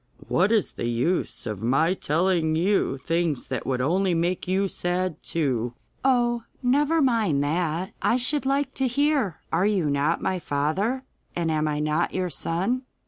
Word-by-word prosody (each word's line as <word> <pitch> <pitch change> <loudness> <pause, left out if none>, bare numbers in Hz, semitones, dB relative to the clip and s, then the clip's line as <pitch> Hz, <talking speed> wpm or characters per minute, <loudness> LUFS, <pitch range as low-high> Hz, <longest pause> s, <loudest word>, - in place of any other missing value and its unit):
'What 190 +5 +2
is 220 -4 +2
the - - -4
use 125 +10 -1
of 105 -4 -4
my 140 +9 +2
telling 165 -1 +1
you 175 -4 +1
things 165 0 -1
that - - -3
would 130 -2 0
only 180 +6 +1
make 175 +2 -1
you 190 +2 +1
sad 180 -1 -1
too?' 125 -7 -1 0.3
'Oh, 240 -3 +2 0.2
never 295 +5 +3
mind 215 - +2
that! 170 +5 -1
I 240 - +3
should 265 +2 0
like 275 0 0
to 265 - +3
hear. 270 - +1
Are 195 - +3
you 185 -8 +1
not 145 +4 +1
my 185 - -1
father, 180 - -1 0.3
and 170 -2 0
am 155 0 +1
I 150 -1 -1
not 155 +3 0
your 185 -2 -1
son? 190 +13 -1
180 Hz, 165 wpm, -25 LUFS, 155-225 Hz, 0.3 s, never